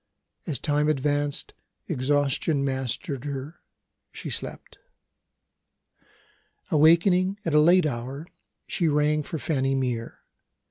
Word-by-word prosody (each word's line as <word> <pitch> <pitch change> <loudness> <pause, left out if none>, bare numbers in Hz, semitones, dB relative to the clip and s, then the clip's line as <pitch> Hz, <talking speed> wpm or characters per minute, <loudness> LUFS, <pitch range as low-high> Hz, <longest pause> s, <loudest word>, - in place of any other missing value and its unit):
As 150 -5 -1
time 150 0 +1
advanced, 145 0 -1 0.3
exhaustion 140 +2 +1
mastered 130 0 -2
her; 145 +4 -6 0.5
she - - -7
slept. - - -6 1.9
Awakening 180 +5 +4
at 165 - -1
a 150 - +6
late 175 +2 +5
hour, 135 +2 -4 0.4
she 170 - 0
rang 150 0 +2
for 160 - -5
Fanny 135 -1 0
Mere. 125 -3 -3
145 Hz, 100 wpm, -26 LUFS, 135-155 Hz, 1.9 s, a